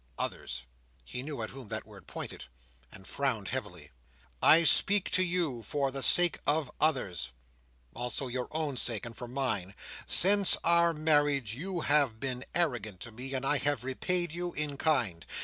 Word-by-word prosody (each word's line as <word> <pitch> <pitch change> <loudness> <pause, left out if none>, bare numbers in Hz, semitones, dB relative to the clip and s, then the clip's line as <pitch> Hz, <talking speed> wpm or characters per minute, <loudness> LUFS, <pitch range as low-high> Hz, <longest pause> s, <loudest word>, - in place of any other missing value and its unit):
Others! - - -4 0.4
He 125 - -5
knew 140 -4 -6
at 110 - -6
whom 135 -3 -11
that - - -5
word - - -15
pointed, - - -7 0.5
and 95 - -13
frowned 120 -7 -2
heavily. 90 - -6 0.5
"I 165 +2 +6
speak 200 +4 +4
to 185 - +3
you 170 -9 0
for 140 +3 -2
the 135 +1 -5
sake 175 +5 +5
of 145 -2 0
others. 100 - 0 0.6
Also 125 +3 -2
your 125 0 -4
own 155 -4 -3
sake; 115 -2 0
and 115 -1 -9
for 120 - -8
mine. 110 -8 -3 0.3
Since 200 +1 +7
our 170 0 +4
marriage, 145 -6 +1
you 175 +6 -5
have 140 -7 +1
been 130 -1 -4
arrogant 120 - -1
to 115 - -7
me; 130 +4 -6
and 130 +1 -3
I 145 +2 +1
have 145 -2 -1
repaid 175 +6 0
you 175 +1 -4
in 150 -1 -2
kind. 120 - 0
135 Hz, 165 wpm, -29 LUFS, 120-160 Hz, 0.6 s, Since